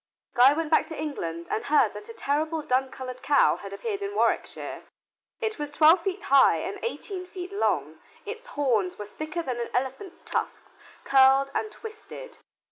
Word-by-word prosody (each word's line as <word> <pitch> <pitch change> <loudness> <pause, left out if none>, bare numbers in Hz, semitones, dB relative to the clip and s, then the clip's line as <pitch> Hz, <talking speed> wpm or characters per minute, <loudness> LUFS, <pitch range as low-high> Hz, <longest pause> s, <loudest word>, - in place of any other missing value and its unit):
Guy 255 +3 +7
went 320 0 -3
back - - +4
to 320 - -7
England 170 - -4
and 225 - -1
heard 300 +1 +3
that 425 - -10
a - - -7
terrible 310 -1 -1
dun 260 0 +1
colored 255 -1 -8
cow 285 -1 +4
had 200 - -9
appeared 400 - -4
in 400 +1 -4
Warwickshire. - - -1 0.6
It 440 -6 -3
was 295 -1 -3
twelve 315 +4 +5
feet 380 +1 -3
high 275 -1 +5
and - - -5
eighteen 395 -5 -4
feet 370 +1 -8
long. 405 - -1 0.3
Its 445 +4 -7
horns 225 -10 +1
were 210 - -6
thicker 310 +10 -5
than 255 -5 -3
an 235 - -3
elephant's 265 +9 -3
tusks - - -4 0.3
curled 270 0 +5
and 430 - -2
twisted. 450 +3 -10
300 Hz, 175 wpm, -26 LUFS, 260-390 Hz, 0.6 s, Guy